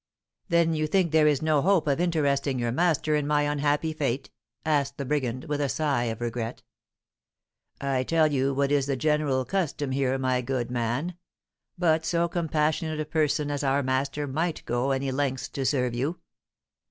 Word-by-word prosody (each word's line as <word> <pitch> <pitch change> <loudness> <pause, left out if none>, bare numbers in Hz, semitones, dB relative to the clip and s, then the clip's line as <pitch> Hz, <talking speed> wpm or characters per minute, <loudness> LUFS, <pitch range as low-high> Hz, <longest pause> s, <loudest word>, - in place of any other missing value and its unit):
"Then 170 -1 +3
you 155 -1 0
think 180 -1 +2
there 155 -1 +5
is 150 -1 +2
no 155 -2 +3
hope 185 -1 +3
of 140 -1 +1
interesting 140 -6 +1
your 120 -1 -1
master 155 +1 +1
in 150 -1 0
my 150 0 +2
unhappy 145 +2 0
fate?" 140 -4 -2 0.3
asked 140 -3 +1
the 140 - -3
brigand, 130 -3 -1
with 145 0 -2
a 140 - 0
sigh 140 -6 0
of 115 -1 -4
regret. 120 0 -4 1.2
"I 135 -2 0
tell 160 +4 +2
you 135 -1 +1
what 140 +1 0
is 140 -2 +2
the 140 - 0
general 150 -3 +1
custom 150 -7 -1
here, 135 0 +1
my 130 -1 0
good 125 -1 -2
man; 125 +9 -2 0.6
but 160 -2 +2
so 170 +1 +1
compassionate 155 -2 -1
a 155 - -1
person 150 -1 0
as 145 0 -2
our 140 +1 +2
master 135 +2 -1
might 160 +5 -2
go 120 +3 0
any 135 0 0
lengths 130 -1 -1
to 135 -2 -2
serve 125 -4 +1
you." 140 +8 -2
145 Hz, 175 wpm, -26 LUFS, 130-155 Hz, 1.2 s, there